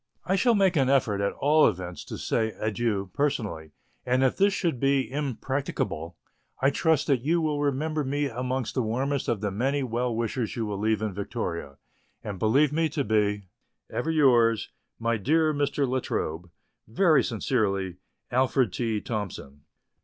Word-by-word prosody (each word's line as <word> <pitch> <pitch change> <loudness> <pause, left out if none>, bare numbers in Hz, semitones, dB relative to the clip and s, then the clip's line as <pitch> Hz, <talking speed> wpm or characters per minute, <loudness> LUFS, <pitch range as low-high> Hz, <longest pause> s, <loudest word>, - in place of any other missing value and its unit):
I 190 - +1
shall 235 +3 +3
make 190 -3 +3
an 135 -3 +3
effort 115 -7 +2
at 100 - 0
all 150 +2 +4
events 90 -1 -4
to - - -6
say 110 -1 -1
adieu 110 -3 -1
personally, 105 - -1 0.3
and 125 +1 +2
if 130 - +2
this 200 +1 +3
should 170 -9 -1
be 135 0 +2
impracticable 130 - -3 0.4
I 135 +1 +3
trust 155 0 +2
that 135 -5 +2
you 165 +6 +1
will 150 -2 0
remember 150 +2 0
me 145 +2 -1
amongst 125 0 -3
the 130 - 0
warmest 130 +5 -1
of 115 -4 0
the 105 -2 -1
many 135 +7 0
well 120 -1 -1
wishers 115 0 -2
you 115 - -2
will 105 -2 -4
leave 110 0 +1
in 105 -3 -2
Victoria; 85 - -4 0.5
and 100 -3 -5
believe 140 +8 +3
me 160 0 +1
to 145 -1 -1
be, 105 -2 +1 0.5
Ever 160 - -2
yours, 120 -8 +3 0.3
my 115 0 0
dear 155 +8 +2
Mr. 145 -1 0
La 130 +1 0
Trobe, 85 -6 -3 0.4
Very 155 - +4
sincerely, 100 -6 -1 0.3
ALFRED 130 -3 +2
T. 110 -3 -1
THOMSON. 90 - -5
125 Hz, 165 wpm, -27 LUFS, 105-145 Hz, 0.5 s, all